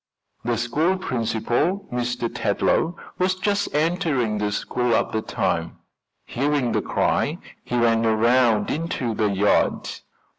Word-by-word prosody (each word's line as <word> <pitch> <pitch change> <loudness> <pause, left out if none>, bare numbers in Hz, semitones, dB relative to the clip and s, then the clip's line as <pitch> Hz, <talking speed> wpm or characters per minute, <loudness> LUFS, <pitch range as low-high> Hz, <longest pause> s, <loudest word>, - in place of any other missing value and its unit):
The 120 0 0
school 150 - +1
principal, 125 - -1
Mr. 120 -1 -1
Tetlow, 160 - 0 0.2
was 185 0 +2
just 205 +2 -1
entering 150 - +1
the 105 0 -1
school 120 +3 0
at - - 0
the 110 - -1
time. - - -2 0.5
Hearing 140 -1 0
the - - +1
cry - - 0 0.3
he 125 - -2
ran 115 -1 +3
around 115 -1 +3
into 145 -7 -2
the 105 -1 +1
yard. 100 +1 +2
120 Hz, 125 wpm, -23 LUFS, 115-160 Hz, 0.5 s, ran